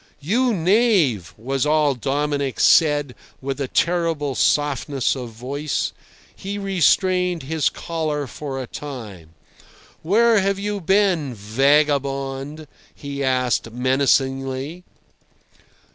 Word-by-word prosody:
"You 235 - +1
knave!" 180 - +2
was 135 +4 -2
all 150 -1 +3
Dominic 140 +1 -2
said, 145 -5 +4 0.3
with 135 +1 -4
a 135 - -1
terrible 165 -3 0
softness 140 -1 +1
of 125 -3 -6
voice. 135 +6 -3 0.4
He 200 +1 -5
restrained 185 -2 +1
his 155 +1 0
choler 155 -3 -3
for 135 0 -6
a 130 - -4
time. 105 - -9 0.7
"Where 220 +6 +4
have 195 0 0
you 205 0 -3
been, 180 - +1
vagabond?" 140 +5 0 0.3
he 140 -1 -5
asked 125 -3 0
menacingly. 135 +4 0
145 Hz, 100 wpm, -21 LUFS, 135-170 Hz, 0.7 s, said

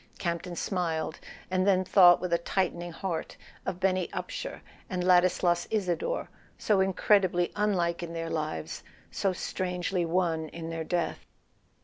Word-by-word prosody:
Campton 175 0 -3
smiled, 165 -4 -2 0.3
and 185 +1 +2
then 185 -1 +4
thought 175 -2 +7
with 180 -1 -2
a 170 - +3
tightening 175 -1 -1
heart 170 0 -4 0.3
of 180 - -2
Benny 185 -1 +1
Upsher - - -5 0.3
and 180 -2 -2
Ladislas 180 -1 +3
Isador, 215 - -1 0.3
so 210 -3 +2
incredibly 190 -2 +3
unlike 180 -5 +1
in 170 -1 -5
their 165 0 -4
lives, 150 - -3 0.3
so 195 - 0
strangely 180 0 -2
one 165 -2 0
in 165 0 -6
their 165 -1 -3
death. 170 0 -2
180 Hz, 135 wpm, -29 LUFS, 170-185 Hz, 0.3 s, thought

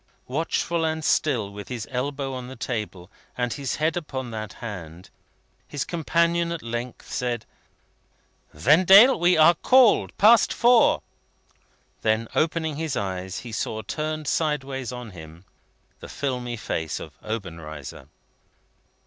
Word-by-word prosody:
Watchful 165 +4 -1
and 160 -1 -1
still, 115 -10 +1
with 100 0 -8
his 120 -4 -5
elbow 135 +1 -3
on 125 -1 -6
the 130 - -9
table, 105 -6 -5 0.3
and 125 -1 -1
his 140 -2 -3
head 155 +1 0
upon 130 -7 -5
that 110 -3 -6
hand, 90 -6 -9 0.6
his 145 -2 -3
companion 170 0 +1
at 170 -2 -5
length 120 +1 -5
said: 120 -3 -2 1.1
"Vendale! 185 - +6
We 175 0 +4
are 160 +2 +7
called. 250 +7 +4
Past 225 +3 +6
Four!" 240 0 +4 1.0
Then, 110 +1 +1
opening 160 -2 0
his 160 -3 -2
eyes, 95 -1 -4
he 120 - -9
saw, 110 0 -3
turned 155 -1 -4
sideways 135 -6 -1
on 125 -3 -7
him, 80 0 -12 0.5
the - - -10
filmy 125 -4 -3
face 80 -6 -3
of - - -9
Obenreizer. 85 - -7
130 Hz, 130 wpm, -24 LUFS, 110-160 Hz, 1.1 s, are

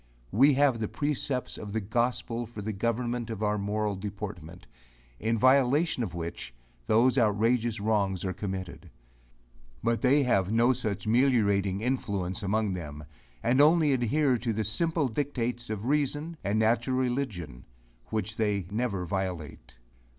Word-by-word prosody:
We 135 +7 +5
have 135 -4 +3
the 110 - -1
precepts 145 -2 -2
of 105 -1 -7
the 110 - +1
gospel 120 +2 -1
for 105 -2 -8
the 110 +1 -3
government 120 +3 -2
of 110 -2 -4
our 105 0 +1
moral 105 0 -1
deportment, 95 -4 -7 0.5
in 115 +1 0
violation 135 +5 +3
of 95 -7 -3
which, 85 -7 -6 0.3
those 125 +4 +4
outrageous 115 +1 +2
wrongs 100 -3 0
are 95 - -1
committed; 95 -2 -6 0.9
but 115 0 +1
they 140 +2 +4
have 100 -6 +1
no 120 +3 +4
such 100 -4 -3
meliorating 105 -5 +2
influence 100 -6 -2
among 105 0 0
them, 75 -4 -6 0.4
and 130 +4 +4
only 155 -1 +5
adhere 130 +1 +2
to 115 - -1
the 110 0 -1
simple 155 - +1
dictates 120 -2 -3
of 110 0 -4
reason, 150 +4 0
and 100 +2 0
natural 115 +4 +2
religion, 120 - -3 0.4
which 110 0 -3
they 105 -4 0
never 105 -5 -1
violate. 90 -9 -4
110 Hz, 145 wpm, -28 LUFS, 100-125 Hz, 0.9 s, We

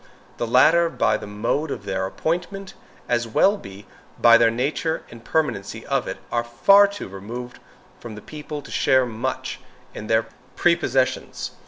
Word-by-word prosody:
The 120 - -2
latter, 160 +8 +5
by 110 - +1
the - - -9
mode 110 +9 -2
of - - -6
their 95 0 -2
appointment, 180 - -3 0.3
as 120 -1 0
well 195 - +2
as 100 +1 -10 0.4
by 115 0 +7
the 115 0 +5
nature 140 +7 -2
and 115 0 -12
permanency 120 -10 -2
of - - -1
it, - - -4
are 120 - +1
too - - -15
far 200 +12 +6 0.3
removed 120 +5 -8 0.4
from 115 -3 -9
the 105 - -9
people 150 -1 -7
to - - -12
share 130 -1 +3
much 110 -2 -4 0.3
in 105 - -7
their 110 0 +2 0.3
prepossessions. 135 -7 0
120 Hz, 160 wpm, -23 LUFS, 115-160 Hz, 0.4 s, by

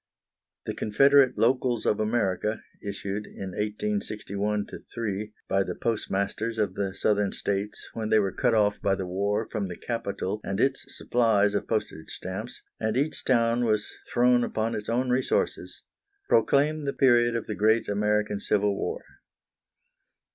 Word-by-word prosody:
The - - -3
Confederate 135 +4 +4
locals 120 -1 +2
of 105 - +2
America, 110 -1 0 0.2
issued, 100 0 -4
in 95 -1 -7
1861 105 - -2 0.3
3, 105 -2 -3
by 95 - +2
the - - -5
postmasters 110 0 -2
of 105 -4 0
the 95 -1 -3
Southern 105 -1 +1
States 100 +1 -3
when 110 -1 -3
they 110 - +5
were 100 -2 +2
cut 120 +1 +1
off 105 -1 +2
by 100 -1 +2
the 95 - -4
war 100 +4 -1
from 105 -4 -2
the 90 - -6
capital 105 -2 -3
and 95 - -3
its 135 0 +1
supplies 110 -4 +2
of 100 - -1
postage 105 -7 -3
stamps, 110 +7 -6 0.2
and 110 +1 0
each 145 +3 -1
town 120 -1 +2
was 110 -2 0 0.2
thrown 125 0 +4
upon 110 0 -1
its 105 - -4
own 125 +2 +1
resources, 130 +1 -1 0.4
proclaim 150 - +3
the 140 - -1
period 120 -3 +4
of 115 - -2
the 105 - -4
great 110 +2 +2
American 105 0 0
Civil 105 -1 +1
War. - - -3
105 Hz, 150 wpm, -27 LUFS, 100-120 Hz, 0.4 s, they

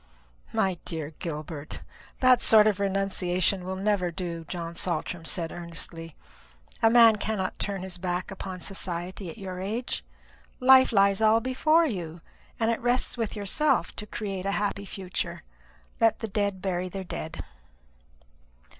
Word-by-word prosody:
"My 185 -3 +1
dear 160 -2 -4
Gilbert, 155 -2 -6 0.4
that 255 -1 +6
sort 215 -1 +6
of 210 -2 +2
renunciation 195 -2 0
will 185 +1 -3
never 195 -2 +1
do," 170 -2 -5
John 170 -2 -4
Saltram 175 -1 -2
said 165 -1 -2
earnestly. 165 -1 -5 0.7
"A 225 - +6
man 230 -2 +7
cannot 205 -3 -2
turn 195 -2 -2
his 185 -2 -5
back 180 +1 -2
upon 185 -1 -6
society 185 -1 -3
at 165 - -9
your 185 -3 -6
age. 220 +6 -3 0.6
Life 260 0 +7
lies 200 -1 +4
all 220 +1 +5
before 310 +7 +3
you, 175 - -4 0.4
and 225 0 +2
it 230 - -2
rests 245 +1 +1
with 230 -3 -2
yourself 210 +9 +1
to 210 - -5
create 195 -3 -4
a 200 - 0
happy 200 -1 -1
future. 190 -2 -4 0.6
Let 225 -1 +4
the 225 - -4
dead 200 -2 -1
bury 185 -1 -1
their 190 +1 -5
dead." 160 -3 -5
195 Hz, 145 wpm, -27 LUFS, 175-215 Hz, 0.7 s, man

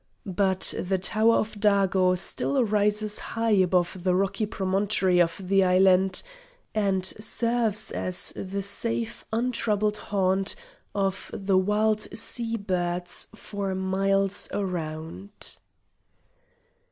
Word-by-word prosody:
But 190 -1 +1
the 190 +1 0
Tower 220 +4 +2
of 220 - -1
Dago 195 -3 +3
still 260 +8 0
rises 210 0 0
high 225 0 -2
above 180 -2 +2
the 180 -1 +2
rocky 195 +3 0
promontory 190 -2 +1
of 165 0 0
the 195 +1 +3
island, 185 +1 +4 0.5
and 195 -3 +1
serves 220 +1 0
as 185 -1 0
the 195 +1 -4
safe 230 +3 -2
untroubled 220 -3 0
haunt 195 -1 0 0.4
of 195 -1 -1
the 195 -1 -1
wild 210 +2 +1 0.2
sea 230 0 0
birds 175 -3 -2
for 200 -3 -4
miles 195 +1 0
around. 160 - -5
195 Hz, 105 wpm, -26 LUFS, 185-210 Hz, 0.5 s, island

